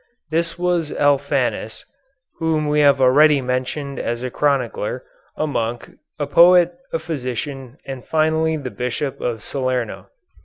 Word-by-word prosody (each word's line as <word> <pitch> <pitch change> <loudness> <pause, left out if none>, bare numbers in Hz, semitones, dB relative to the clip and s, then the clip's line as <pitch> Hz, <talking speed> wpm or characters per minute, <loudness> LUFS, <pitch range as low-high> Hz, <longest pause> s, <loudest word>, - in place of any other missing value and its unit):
This 165 +1 -1
was 175 -3 0
Alphanus, 140 -5 0 0.5
whom 160 -2 0
we 150 0 +2
have 140 -2 +5
already 145 +3 +5
mentioned 130 +2 -3
as 120 +1 -3
a 130 - -3
chronicler, 130 -4 -1 0.3
a 155 - 0
monk, 120 -5 -3 0.3
a 145 - -1
poet, 175 +3 +6 0.2
a - - 0
physician, 135 -4 -5
and 135 -2 -7
finally 160 0 +1
the 135 -4 -6
Bishop 125 +3 -3
of 115 -3 -3
Salerno. 130 -4 -3
140 Hz, 130 wpm, -20 LUFS, 125-155 Hz, 0.5 s, poet